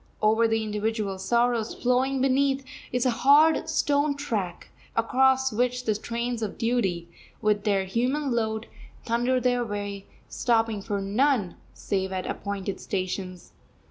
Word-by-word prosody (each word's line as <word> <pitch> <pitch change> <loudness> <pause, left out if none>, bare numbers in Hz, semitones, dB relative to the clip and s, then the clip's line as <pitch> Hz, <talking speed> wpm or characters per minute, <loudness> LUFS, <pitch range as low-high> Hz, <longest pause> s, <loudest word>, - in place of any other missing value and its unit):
Over 220 +2 +3
the 225 0 0
individual 210 -2 -2
sorrows, 235 +2 +1
flowing 255 +2 +1
beneath, 270 0 +2 0.3
is 250 +1 0
a 255 - +3
hard 300 +4 +5
stone 285 0 +1
track, 205 -11 -3 0.3
across 265 +2 +3
which 250 +2 0
the 215 - +2
trains 235 +2 -3
of 215 -3 -4
duty, 210 -8 0 0.3
with 210 -2 +1
their 195 -2 +2
human 255 +8 0
load, 220 -1 -1 0.4
thunder 240 +2 +1
their 245 0 +1
way, 205 -2 -5 0.2
stopping 225 -3 0
for 200 +1 -2
none 210 -1 +1 0.2
save 190 -1 -2
at 185 -1 -3
appointed 200 -1 -4
stations. 185 -1 -4
230 Hz, 135 wpm, -26 LUFS, 200-250 Hz, 0.4 s, hard